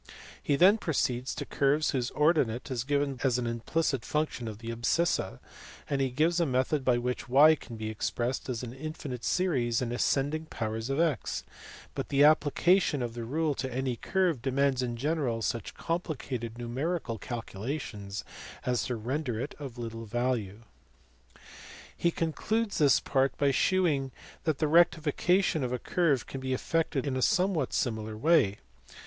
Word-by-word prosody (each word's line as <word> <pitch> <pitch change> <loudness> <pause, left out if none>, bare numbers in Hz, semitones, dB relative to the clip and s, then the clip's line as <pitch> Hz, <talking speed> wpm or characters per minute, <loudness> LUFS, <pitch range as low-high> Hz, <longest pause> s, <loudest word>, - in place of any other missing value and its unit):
He 145 - +1
then 190 +8 +6
proceeds 130 -7 -1
to - - -4
curves 145 +2 +2
whose 130 -2 -1
ordinate 150 -7 +1
is 120 -2 -1
given 140 -1 0
as 130 -3 +2
an 125 - -2
implicit 120 +3 -1
function 150 -5 -2
of 110 -2 -6
the 115 +1 -6
abscissa; 120 - 0 0.5
and 140 -1 0
he 135 - +1
gives 160 +7 +1
a 170 - +3
method 130 +2 +1
by 125 -2 +3
which 125 0 -3
y 145 +5 +7
can 125 -6 -7
be 110 0 -4
expressed 120 +4 -2
as 125 -1 -3
an 120 -1 -6
infinite 140 -3 -6
series 130 -11 +1
in 120 -2 -2
ascending 145 +5 0
powers 110 -2 -4
of 135 - 0
05, 160 - 0 0.5
but - - -4
the 140 0 +4
application 155 0 +4
of 120 -1 -4
the 120 0 -5
rule 155 +4 0
to 130 -1 -4
any 130 0 -1
curve 175 - 0
demands 135 0 +1
in 120 -2 -2
general 135 -4 -1
such 115 -1 -3
complicated 135 -9 -3
numerical 120 +1 -3
calculations 105 -2 -5 0.4
as 125 -4 +1
to 125 - -2
render 125 +1 -2
it 135 +5 -4
of 135 -4 -7
little 115 -1 -6
value. 115 -3 -2 1.3
He 170 - +2
concludes 205 +7 -1
this 140 -5 +5
part 135 -1 +1
by 140 -1 +3
shewing 145 -4 +2 0.3
that 155 -3 +1
the 155 - +1
rectification 165 +1 +3
of 125 - -2
a 125 - 0
curve 145 -2 +1
can 135 - -7
be 130 0 -1
effected 155 -1 -1
in 135 -2 -1
a 130 - -1
somewhat 185 - +2
similar 110 -3 -2
way. 120 -7 +3
135 Hz, 165 wpm, -29 LUFS, 120-155 Hz, 1.3 s, y